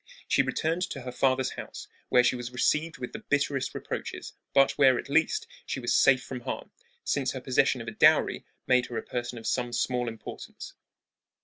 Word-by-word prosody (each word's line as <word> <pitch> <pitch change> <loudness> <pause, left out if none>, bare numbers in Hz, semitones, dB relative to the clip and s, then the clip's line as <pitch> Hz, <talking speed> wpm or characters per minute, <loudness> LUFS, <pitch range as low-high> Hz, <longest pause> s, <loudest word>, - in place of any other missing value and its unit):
She - - +4
returned 165 +3 -1
to 140 - -6
her 125 0 -6
father's 130 0 +1
house, - - -8 0.2
where 125 - +5
she 125 - +3
was 120 -1 -5
received 155 +6 0
with 125 -1 -6
the - - -5
bitterest 145 -2 0
reproaches, - - -5 0.2
but 135 -1 +5
where, 135 -3 +4
at - - -6
least, 160 - +2 0.2
she - - -4
was - - 0
safe 130 -1 +5
from 130 - -6
harm, 120 - -6 0.3
since 135 -2 0
her 130 - -4
possession 130 -1 +2
of 115 - -9
a - - -3
dowry 110 - +4 0.2
made 125 -1 +3
her 120 - -5
a - - -3
person 120 0 -4
of 115 - -9
some 120 -1 -1
small 125 0 0
importance. 115 -2 -8
130 Hz, 195 wpm, -28 LUFS, 125-140 Hz, 0.3 s, where